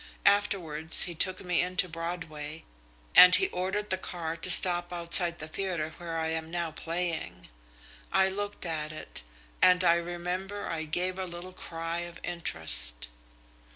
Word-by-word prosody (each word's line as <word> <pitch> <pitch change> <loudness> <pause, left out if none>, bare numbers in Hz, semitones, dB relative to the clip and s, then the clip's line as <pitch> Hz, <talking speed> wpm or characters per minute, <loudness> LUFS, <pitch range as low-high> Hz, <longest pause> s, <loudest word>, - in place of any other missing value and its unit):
Afterwards 180 -6 +2
he 175 - -3
took 185 +3 +1
me 180 -1 +1
into 180 +1 0
Broadway, 165 -2 -7 0.5
and 180 0 +9
he 385 - +1
ordered 195 - -4
the 190 - 0
car 165 -3 -5
to 185 - -3
stop 175 -1 +8
outside 170 0 +3
the 155 - -8
theatre 170 -2 -4
where 170 -1 -7
I 160 0 -3
am 160 0 -5
now 170 -1 -4
playing. 170 +1 -5 0.6
I 190 +1 +3
looked 205 0 -5
at 155 -2 -4
it, 155 - -5 0.4
and 180 0 +4
I 170 - +4
remember 180 +4 -6
I 160 -1 -4
gave 180 +4 -2
a 190 - -3
little 175 +1 -10
cry 165 -1 -6
of 175 -1 -8
interest. 80 - 0
175 Hz, 155 wpm, -27 LUFS, 160-185 Hz, 0.6 s, and